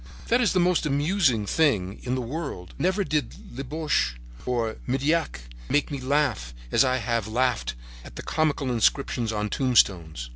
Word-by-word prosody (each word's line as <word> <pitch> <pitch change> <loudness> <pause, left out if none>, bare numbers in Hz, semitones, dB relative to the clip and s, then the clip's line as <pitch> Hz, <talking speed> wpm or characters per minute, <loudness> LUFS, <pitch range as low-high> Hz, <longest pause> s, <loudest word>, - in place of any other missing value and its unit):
That 240 +2 +4
is 235 - +2
the 185 - +3
most 175 -3 +2
amusing 145 - +2
thing 100 - +1
in 125 +1 -2
the 130 - -2
world. 130 - -6
Never 190 +3 +1
did 150 -3 -1 0.2
Labiche 135 - -1 0.3
or 115 -3 -1
Meilhac 140 - 0 0.3
make 145 - +1
me 140 - -3
laugh 130 - 0 0.2
as - - +5
I 130 -1 +2
have 115 -3 -1
laughed 125 - 0 0.3
at - - -12
the - - -7
comical 145 -4 0
inscriptions 120 -1 +1
on 105 -1 -1
tombstones. 85 - +2
130 Hz, 155 wpm, -25 LUFS, 110-150 Hz, 0.3 s, as